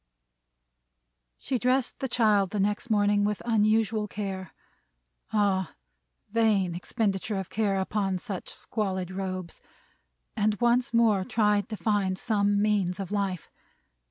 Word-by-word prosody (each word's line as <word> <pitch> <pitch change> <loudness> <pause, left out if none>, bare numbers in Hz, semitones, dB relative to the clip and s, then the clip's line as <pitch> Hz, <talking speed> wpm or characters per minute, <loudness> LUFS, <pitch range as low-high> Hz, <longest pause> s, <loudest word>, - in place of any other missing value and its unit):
She 255 - -2
dressed 255 +1 +1
the 265 - -2
child 210 -5 +2
next 210 +4 0
morning 205 -1 +3
with 210 0 0
unusual 220 -1 +2
care 190 -3 -5 0.8
ah, 200 -4 +1 0.6
vain 210 -5 +2
expenditure 200 +3 -1
of 190 -2 -5
care 200 -3 +1
upon 195 -1 -1
such 190 0 -6
squalid 190 -4 -3
robes! 185 -2 -5 0.7
and 210 0 +1
once 240 +1 +2
more 225 -5 +3
tried 210 -3 +1
to 215 - -4
find 200 -4 0
some 205 -1 +1
means 200 -3 +1
of 195 -1 -5
life. 195 -4 -2
205 Hz, 120 wpm, -27 LUFS, 190-220 Hz, 0.8 s, morning